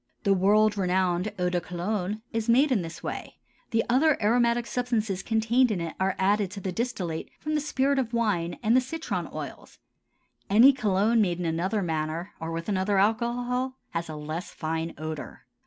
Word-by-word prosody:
The 200 - +4
world 205 +2 +3
renowned 185 +1 +1
eau 180 -1 0
de 175 -1 0
Cologne 190 +4 -3
is 225 0 -2
made 265 +5 +5
in 225 -7 +3
this 165 -1 -8
way; - - -5 0.3
the 225 -2 +2
other 280 +5 +3
aromatic 235 +2 +2
substances 225 -7 -1
contained 230 +4 +2
in 205 -5 -1
it 165 -1 -4
are 190 0 +1
added 200 +1 +2
to 200 +2 -7
the 190 -1 -3
distillate 180 -7 -3
from 310 - -3
the 300 - +1
spirit 280 -1 +1
of 240 -3 -2
wine 200 -8 0
and 225 +2 +4
the 255 - +6
citron 320 +6 -4
oils; - - -8 0.7
any 235 +8 +7
cologne 220 -1 +2
made 175 -4 +1
in 175 - -2
another 185 +6 0
manner 160 +2 -2
or 165 0 -4
with 165 0 -4
another 195 0 +1
alcohol 245 +5 0
has 165 -1 -3
a 155 - -5
less 155 +4 -5
fine 160 +1 -3
odor. 155 0 -6
205 Hz, 180 wpm, -27 LUFS, 175-235 Hz, 0.7 s, any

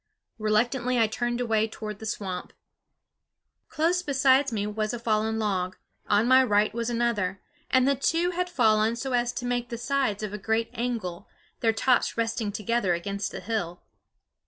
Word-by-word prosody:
Reluctantly 240 +4 +1
I 230 - +5
turned 240 +2 -2
away 220 -3 +1
toward 215 -2 -7
the 220 - -6
swamp. 190 -4 -4 1.2
Close 330 +3 +1
beside 275 -3 +3
me 210 -2 -1
was 215 +2 -2
a - - -6
fallen 220 -1 0
log; 185 -4 -1 0.3
on 210 +3 +3
my 260 +1 +7
right 210 -3 +2
was 235 0 -2
another; 230 -6 0 0.3
and 260 0 +4
the 280 - +4
two 330 +6 +1
had 360 0 -2
fallen 220 -7 +3
so 255 +2 -4
as 240 0 +1
to 245 - -4
make 245 0 -1
the 235 - -4
sides 240 -4 -1
of 210 -1 -4
a 210 - -4
great 220 +3 0
angle, 225 -7 -3 0.3
their 225 - +3
tops 240 +2 +1
resting 225 -2 -1
together 210 -3 0
against 200 +3 -3
the - - -7
hill. 180 -4 -3
225 Hz, 170 wpm, -27 LUFS, 210-245 Hz, 1.2 s, my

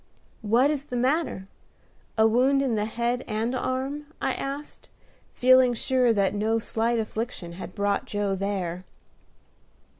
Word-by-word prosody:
"What 235 +6 +3
is 285 -2 -3
the 250 - -6
matter? 255 - 0 0.7
A 220 - +5
wound 260 +5 +3
in 260 -4 0
the 210 -1 0
head 235 +3 -1
and 225 +3 -1
arm?" 265 +3 -2
I 265 - 0
asked, 280 +2 -6 0.5
feeling 255 -1 +5
sure 250 0 +2
that 200 -3 +2
no 215 +2 +1
slight 225 +1 0
affliction 220 -5 -4
had 180 +1 -8
brought 200 0 0
Joe 205 -1 -1
there. 190 -3 -3
235 Hz, 140 wpm, -26 LUFS, 205-260 Hz, 0.7 s, A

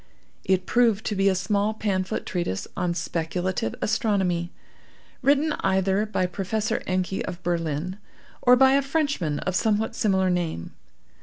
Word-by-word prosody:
It 185 -1 +1
proved 230 -4 +2
to 210 - -1
be 195 0 +3
a 190 - +1
small 205 +3 0
pamphlet 190 -4 -2
treatise 170 - -2
on 175 -2 -1
Speculative 170 -5 -2
Astronomy, 190 -6 0 0.7
written 290 +3 +3
either 190 +2 +1
by 185 -3 0
Professor 205 +5 -2
Encke 185 +1 -1
of 180 0 -7
Berlin 170 +1 -2 0.4
or 250 0 +6
by 265 +1 +6
a 280 - +4
Frenchman 275 - -1
of 185 - -2
somewhat 220 +1 +1
similar 190 -3 +2
name. 170 - -2
190 Hz, 140 wpm, -25 LUFS, 180-220 Hz, 0.7 s, or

